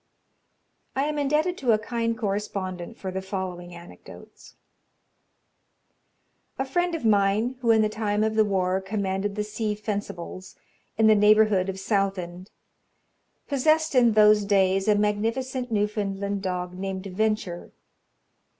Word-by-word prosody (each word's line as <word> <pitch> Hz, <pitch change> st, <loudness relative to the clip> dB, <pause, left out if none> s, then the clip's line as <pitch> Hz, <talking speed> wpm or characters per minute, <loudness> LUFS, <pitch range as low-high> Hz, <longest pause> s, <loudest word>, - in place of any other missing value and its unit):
I 270 Hz, -, +1 dB
am 300 Hz, 0 st, -1 dB
indebted 300 Hz, +5 st, 0 dB
to 245 Hz, -4 st, +3 dB
a -, -, +4 dB
kind 230 Hz, +1 st, -2 dB
correspondent 195 Hz, -2 st, -4 dB
for 190 Hz, -, -5 dB
the 190 Hz, +1 st, -3 dB
following 185 Hz, -2 st, -5 dB
anecdotes: 170 Hz, +1 st, -14 dB, 2.0 s
"A 265 Hz, -, -1 dB
friend 350 Hz, +5 st, 0 dB
of 310 Hz, -, -5 dB
mine, 210 Hz, +4 st, +2 dB
who 240 Hz, -2 st, -1 dB
in 220 Hz, -1 st, +5 dB
the -, -, +3 dB
time 210 Hz, -1 st, -1 dB
of 220 Hz, 0 st, 0 dB
the 220 Hz, 0 st, +4 dB
war 190 Hz, -2 st, 0 dB
commanded 195 Hz, 0 st, -2 dB
the 210 Hz, -, -1 dB
Sea 210 Hz, 0 st, -3 dB
Fencibles, 200 Hz, -3 st, -6 dB, 0.4 s
in 220 Hz, -, +4 dB
the 220 Hz, -, +7 dB
neighbourhood 210 Hz, -2 st, +4 dB
of 190 Hz, 0 st, -5 dB
Southend, 190 Hz, -2 st, -2 dB, 1.0 s
possessed 310 Hz, +3 st, +2 dB
in 240 Hz, -3 st, +5 dB
those 210 Hz, -1 st, +5 dB
days 195 Hz, -1 st, +2 dB
a 210 Hz, -, +5 dB
magnificent 230 Hz, +5 st, -1 dB
Newfoundland 205 Hz, -1 st, -1 dB
dog, 180 Hz, -1 st, -3 dB
named 190 Hz, +1 st, -5 dB
Venture. 195 Hz, -2 st, -2 dB
210 Hz, 130 wpm, -25 LUFS, 190-225 Hz, 2.0 s, the